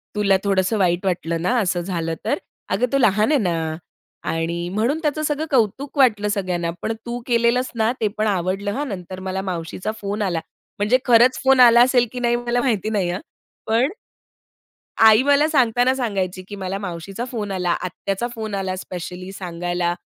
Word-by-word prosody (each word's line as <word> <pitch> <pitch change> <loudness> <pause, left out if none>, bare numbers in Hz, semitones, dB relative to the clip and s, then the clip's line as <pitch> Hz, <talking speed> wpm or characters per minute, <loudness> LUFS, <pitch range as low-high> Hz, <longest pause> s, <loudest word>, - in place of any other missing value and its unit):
"तुला 200 -2 +3
थोडंसं 195 +2 +1
वाईट 180 0 +1
वाटलं 170 -2 -1
ना, 240 +9 +1
असं 180 -3 0
झालं 170 -3 -3
तर. - - +1 0.3
अगं 200 +7 +1
तो 275 - +3
लहान 215 +1 +3
आहे 290 - +4
ना 165 -4 -1 0.5
आणि 170 +1 -2
म्हणून 235 +10 +1
त्याचं 310 -1 -1
सगळं 300 +1 -1
कौतुक 265 +4 0
वाटलं 215 -6 +4
सगळ्यांना. 180 -5 -1
पण 225 - -1
तू 240 +1 -4
केलेलस 235 +1 +2
ना, 225 0 +2
ते 215 - +3
पण 215 0 +1
आवडलं 195 +1 -1
हां, 290 +5 -2
नंतर 185 -3 -6
मला 190 +1 -2
मावशीचा 185 +2 -4
फोन 205 +1 -3
आला." 175 -5 0 0.4
म्हणजे 210 +5 +3
खरंच 245 +1 +5
फोन 265 -1 +5
आला 240 -1 +8
असेल 245 -1 +4
की 250 - -5
नाही, 240 -1 +2
मला 240 0 0
माहिती 215 -5 0
नाही 195 -5 0
हां, 180 - -2 0.5
पण 235 +6 +2 1.1
आई 220 +1 +7
मला 285 +2 +4
सांगताना 250 -3 +3
सांगायची, 195 -7 -2
की 205 - -7
"मला 190 0 -4
मावशीचा 195 +3 -5
फोन 210 -5 -4
आला, 180 -2 -1
आत्याचा 195 +4 -3
फोन 220 -2 -5
आला 190 -1 -2
स्पेशली 180 0 -7
सांगायला, 175 -1 -2
205 Hz, 175 wpm, -21 LUFS, 185-240 Hz, 1.1 s, आला